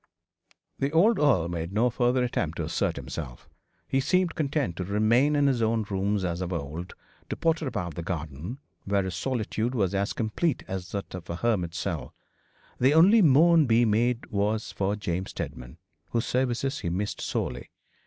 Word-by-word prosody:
The 140 Hz, -, +1 dB
old 200 Hz, +7 st, +4 dB
earl 125 Hz, -, +3 dB
made 85 Hz, 0 st, -4 dB
no 120 Hz, +4 st, +2 dB
further 125 Hz, +2 st, +2 dB
attempt 85 Hz, -9 st, -2 dB
to 80 Hz, -, -2 dB
assert 80 Hz, +1 st, -1 dB
himself. -, -, -7 dB, 0.4 s
He 135 Hz, -, +1 dB
seemed 175 Hz, +5 st, +2 dB
content 140 Hz, -, -1 dB
to 95 Hz, -, -2 dB
remain 110 Hz, +9 st, +3 dB
in 145 Hz, -1 st, +3 dB
his 130 Hz, -4 st, +2 dB
own 110 Hz, 0 st, +1 dB
rooms 100 Hz, 0 st, 0 dB
as 85 Hz, 0 st, -2 dB
of 90 Hz, 0 st, -3 dB
old, 85 Hz, +2 st, -5 dB, 0.3 s
to -, -, -2 dB
potter 160 Hz, -2 st, 0 dB
about 90 Hz, -9 st, -3 dB
the 85 Hz, -, -5 dB
garden, 80 Hz, -, -5 dB, 0.3 s
where 100 Hz, 0 st, +1 dB
his 95 Hz, -1 st, -4 dB
solitude 120 Hz, +2 st, -2 dB
was 100 Hz, -5 st, +1 dB
as 100 Hz, +1 st, 0 dB
complete 120 Hz, +7 st, -1 dB
as 95 Hz, -1 st, -5 dB
that 100 Hz, -1 st, -4 dB
of 90 Hz, -1 st, -8 dB
a 85 Hz, -, -2 dB
hermit's 90 Hz, -5 st, -1 dB
cell. -, -, -4 dB, 0.6 s
The 135 Hz, +4 st, +4 dB
only 195 Hz, +8 st, +7 dB
moan 160 Hz, 0 st, +6 dB
be 120 Hz, +1 st, +4 dB
made 115 Hz, +2 st, +1 dB
was 105 Hz, +2 st, 0 dB
for 100 Hz, +1 st, -1 dB
James 95 Hz, -2 st, -3 dB
Steadman, 60 Hz, +4 st, -7 dB, 0.3 s
whose 115 Hz, +1 st, -1 dB
services 130 Hz, +2 st, 0 dB
he 85 Hz, -, -3 dB
missed 100 Hz, +4 st, -3 dB
sorely. 65 Hz, 0 st, -3 dB
110 Hz, 175 wpm, -27 LUFS, 90-130 Hz, 0.6 s, only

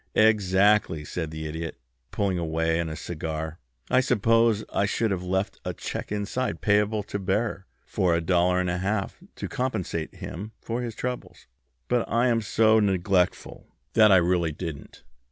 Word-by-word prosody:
"Exactly," 100 Hz, -5 st, +3 dB
said 80 Hz, +1 st, -4 dB
the 80 Hz, 0 st, -6 dB
Idiot, 80 Hz, +1 st, -5 dB, 0.3 s
pulling 95 Hz, -3 st, -1 dB
away 80 Hz, 0 st, 0 dB
on 85 Hz, -, -1 dB
his 80 Hz, 0 st, -6 dB
cigar. 80 Hz, 0 st, -5 dB, 0.3 s
"I 125 Hz, -, +4 dB
suppose 115 Hz, -3 st, +3 dB
I 100 Hz, -, +2 dB
should 110 Hz, +1 st, 0 dB
have 95 Hz, -2 st, -1 dB
left 95 Hz, +2 st, -2 dB
a -, -, -4 dB
check -, -, -5 dB
inside 105 Hz, +5 st, -2 dB
payable 105 Hz, 0 st, +2 dB
to 100 Hz, -, -4 dB
bearer 95 Hz, +1 st, -1 dB, 0.2 s
for 90 Hz, -3 st, +1 dB
a -, -, +2 dB
dollar 90 Hz, +1 st, +2 dB
and 90 Hz, 0 st, 0 dB
a 90 Hz, -, -2 dB
half 100 Hz, -, -2 dB
to -, -, -5 dB
compensate 105 Hz, -, -3 dB
him 105 Hz, +5 st, -7 dB
for 115 Hz, +2 st, -3 dB
his 115 Hz, -3 st, -5 dB
trouble, 125 Hz, +1 st, -4 dB, 0.5 s
but 125 Hz, -1 st, +2 dB
I 120 Hz, +2 st, +3 dB
am 115 Hz, -1 st, +2 dB
so 110 Hz, +1 st, +4 dB
neglectful 95 Hz, -2 st, 0 dB, 0.2 s
that 110 Hz, -2 st, +6 dB
I 95 Hz, -, +8 dB
really 85 Hz, -2 st, +2 dB
didn't." 80 Hz, -2 st, -8 dB
95 Hz, 165 wpm, -26 LUFS, 85-110 Hz, 0.5 s, I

